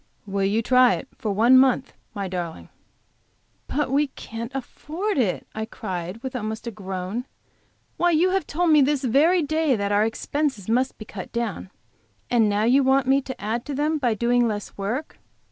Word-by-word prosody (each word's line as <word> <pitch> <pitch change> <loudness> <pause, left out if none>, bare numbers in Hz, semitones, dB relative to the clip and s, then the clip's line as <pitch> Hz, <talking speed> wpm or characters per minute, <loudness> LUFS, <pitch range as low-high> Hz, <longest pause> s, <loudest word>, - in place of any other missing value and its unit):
Will 200 -1 -1
you 215 +4 +1
try 250 +1 +5
it - - -7
for 220 -5 -3
one 235 +6 +6
month, 265 0 +2 0.2
my 200 -1 -3
darling?" 175 -3 -5 1.0
"But 295 -2 -1
we 290 +2 +3
can't 230 -2 -7
afford 320 - -3
it," 205 -8 0
I 220 0 -3
cried, 185 0 -6
with 265 -1 -5
almost 220 -1 -4
a 235 - -3
groan. 195 +3 -5 0.7
"Why, 350 - +3
you 345 +3 +3
have 385 -4 0
told 340 +2 +1
me 300 -1 +6
this 280 0 +2
very 310 +8 +4
day 310 -2 +1
that 200 -1 -2
our 205 +1 +4
expenses 230 0 -2
must 250 +4 +1
be 215 - -9
cut 195 -3 -8
down, 235 -5 -3 0.6
and 225 -3 +4
now 205 +1 +1
you 260 +5 +4
want 265 0 +3
me 270 +2 +3
to 260 0 -8
add 225 +3 -2
to 285 - -4
them 305 +2 0
by 240 -5 +1
doing 240 +2 +2
less 210 -3 -4
work. 230 +10 -4
245 Hz, 185 wpm, -24 LUFS, 210-280 Hz, 1.0 s, one